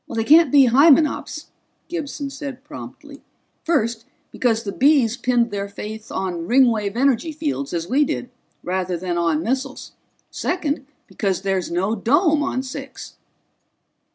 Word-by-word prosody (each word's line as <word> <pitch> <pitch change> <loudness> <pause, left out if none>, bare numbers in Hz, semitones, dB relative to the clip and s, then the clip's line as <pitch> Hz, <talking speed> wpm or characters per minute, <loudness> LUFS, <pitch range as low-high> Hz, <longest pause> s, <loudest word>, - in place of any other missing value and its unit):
"They 225 - -1
can't 310 +2 +6
be 280 -2 +7
Hymenops," 295 +4 +3 0.4
Gibson 290 -4 -5
said 275 -2 -7
promptly. 300 0 -11 0.4
"First, 235 -8 0 0.3
because 230 -2 0
the 200 - -4
Bees 260 -2 +3
pinned 240 -2 +1
their 200 0 -4
faith 215 +2 -8
on 175 -3 -3
Ringwave 230 -5 +3
energy 275 +4 +2
fields, 290 -2 -3
as 170 -1 -3
we 275 +8 +3
did, 255 -3 -3 0.3
rather 180 0 -2
than 175 0 -2
on 165 -2 +1
missiles. 265 +4 -3 0.4
Second, 295 -6 -2 0.2
because 195 -2 -2
there's 190 -2 -1
no 185 +5 0
dome 295 - +2
on 265 -2 -1
Six." 270 +1 -9
250 Hz, 135 wpm, -21 LUFS, 200-285 Hz, 0.4 s, be